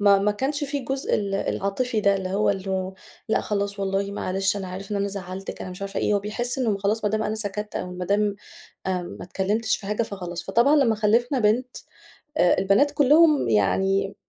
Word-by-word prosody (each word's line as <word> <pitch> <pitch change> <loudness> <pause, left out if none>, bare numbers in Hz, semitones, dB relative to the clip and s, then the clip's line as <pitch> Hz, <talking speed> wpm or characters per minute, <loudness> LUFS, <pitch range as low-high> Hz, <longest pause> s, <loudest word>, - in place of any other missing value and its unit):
ما 200 -1 +6
ما 205 +1 +1
كانش 285 +6 -2
في 285 +1 -2
الجزء 270 +1 -1
ال 200 -2 -1
العاطفي 215 +4 -1
ده، 200 -1 +3
اللي 190 -1 -4
هو 205 +2 +2
اللو 190 -1 -3 0.3
لأ - - +2
خلاص 200 -1 -2
والله 195 +1 -1
معلش، 195 +1 0
أنا 195 -2 -5
عارف 190 +2 -7
إن 205 - -1
أنا 200 0 0
زعلتِك، 195 -1 -6
أنا 185 - -6
مش 180 +2 -8
عارفة 195 0 -3
إيه، 210 - +2
هو - - +3
بيحس 240 +5 -2
إن 245 -4 +1
مو 200 - -1
خلاص 210 +3 0
ما 210 - +2
دام 220 0 0
أنا 215 - -1
سكتت 210 -1 -3
أو 180 - -4
ما 180 0 -5
دام 205 +2 +1 0.5
آمم 180 -2 -3
ما - - -7
اتكلمتش 210 +5 0
في 195 - -11
حاجة، 210 +3 0
فخلاص. 180 -5 -5
فطبعًا 235 +10 +4
لمّا 255 -6 +4
خلفنا 230 +5 +2
بنت 240 +4 +1 0.6
آآ 175 - +5
البنات 200 +10 +3
كلّهم 295 - +4
يعني 195 - +1
200 Hz, 210 wpm, -24 LUFS, 195-225 Hz, 0.6 s, ما